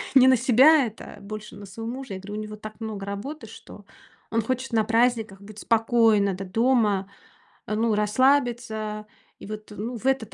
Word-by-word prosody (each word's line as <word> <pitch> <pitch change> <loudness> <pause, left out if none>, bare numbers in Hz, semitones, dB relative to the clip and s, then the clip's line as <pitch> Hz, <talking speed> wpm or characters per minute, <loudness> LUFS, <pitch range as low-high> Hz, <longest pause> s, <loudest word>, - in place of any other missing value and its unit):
не 260 -1 +8
на 260 - +5
себя 265 +5 +5
это, 220 -1 -9
а - - -15
больше 215 +1 -8
на 205 - -10
своего 225 +4 -7
мужа. 260 -4 -7
Я 190 - -5
говорю: 200 +2 -9
"У - - -4
него 215 0 -6
так 215 +1 -10
много 215 -3 -5
работы, 225 +7 -6
что 210 -1 -13 0.5
он 230 +1 +1
хочет 255 +4 -3
на 225 -1 +2
праздниках 225 -4 +1
быть 210 +1 -12
спокойно 225 -3 +3
д 190 +1 -6
дома 210 -2 +1 0.6
ну, 220 +1 +1
расслабиться, 220 -2 +1 0.3
и - - -10
вот, 215 0 -7
ну, 230 +5 -5
в 230 - -13
этот 265 -5 0
220 Hz, 185 wpm, -25 LUFS, 210-245 Hz, 0.6 s, не